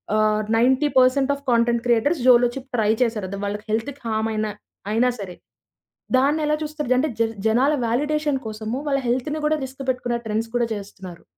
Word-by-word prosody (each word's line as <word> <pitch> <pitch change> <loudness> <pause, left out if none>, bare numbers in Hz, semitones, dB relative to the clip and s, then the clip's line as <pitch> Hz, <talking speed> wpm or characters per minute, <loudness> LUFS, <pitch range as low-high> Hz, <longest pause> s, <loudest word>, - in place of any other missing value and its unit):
ఆహ్, 215 0 +2 0.2
90% 265 +2 +3
of 280 - -14
content 235 0 +2
creators 245 +6 +2
Jolo Chip 250 +1 +4
try 215 -1 +3
చేశారు 215 -5 -2
దా 200 - -4
వాళ్ళకి 205 +1 -4
హెల్త్‌కి 270 +6 -2
హామ్ 220 0 0
అయినా, 215 0 -1 0.4
అయినా 245 +3 +3
సరే. 180 -3 -7 0.8
దాన్నెలా 300 +3 +2
చూస్తారు 295 -4 -1
అంటే 305 +2 +1
జర్ 225 0 +1
జనాల 260 +7 +3
వాలిడేషన్ 295 +3 0
కోసము 220 +2 -4
వాళ్ళ 275 -1 +1
హెల్త్‌నీ 260 +6 -1
కూడా 310 0 +1
రిస్క్ 265 +1 -9
పెట్టుకున్న 250 -1 -1
ట్రెండ్స్ 220 +1 -2
కూడా 240 - +2
చేస్తున్నారు. 190 -4 -10
245 Hz, 160 wpm, -22 LUFS, 220-275 Hz, 0.8 s, Jolo Chip